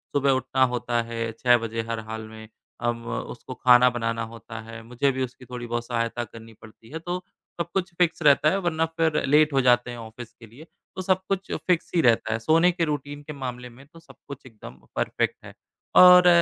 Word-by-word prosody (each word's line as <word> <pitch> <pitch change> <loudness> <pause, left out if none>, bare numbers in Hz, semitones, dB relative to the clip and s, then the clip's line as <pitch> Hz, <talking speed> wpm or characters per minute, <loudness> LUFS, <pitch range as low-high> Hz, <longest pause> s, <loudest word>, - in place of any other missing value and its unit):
सुबह 140 -1 +3
उठना 130 0 +1
होता 120 0 -1
है 115 -1 -4
6 120 +2 +3
बजे 115 0 -4
हर 115 -1 -2
हाल 110 0 -7
में, 110 0 -12 0.3
अब 120 0 -2
उसको 120 +2 -6
खाना 125 0 +5
बनाना 115 -1 -2
होता 115 0 -9
है, 115 0 -10
मुझे 125 +4 0
भी 130 0 -2
उसकी 125 0 -8
थोड़ी-बहुत 120 -1 -5
सहायता 115 0 -2
करनी 115 0 -13
पड़ती 110 +1 -16
है 160 +3 -6
तो 175 +2 -4 0.4
सब 170 - -4
कुछ 185 -2 -2
फिक्स 175 -1 +1
रहता 145 +1 +5
है 190 - +1
वरना 165 -3 0
फिर 160 -2 +1
लेट 150 +2 +4
हो 135 - +3
जाते 125 -1 +3
हैं 120 - -7
ऑफ़िस 115 +1 -10
के 115 - -15
लिए। 125 +9 -14 0.3
तो 185 - -4
सब 185 0 +1
कुछ 195 0 -2 0.2
फिक्स 180 -2 +1
ही 170 - +4
रहता 115 -4 +2
है, 115 - -2
सोने 165 +9 +3
के 170 -1 -1
रूटीन 145 -1 -4
के 150 - -8
मामले 125 -3 -6
में 125 +4 -16
तो 165 +2 -17
सब 165 - -18
कुछ 140 -1 -10
एकदम 110 - -12 0.2
परफेक्ट - - -1
है। - - -11 0.4
और 180 0 +9
125 Hz, 210 wpm, -25 LUFS, 115-155 Hz, 0.4 s, और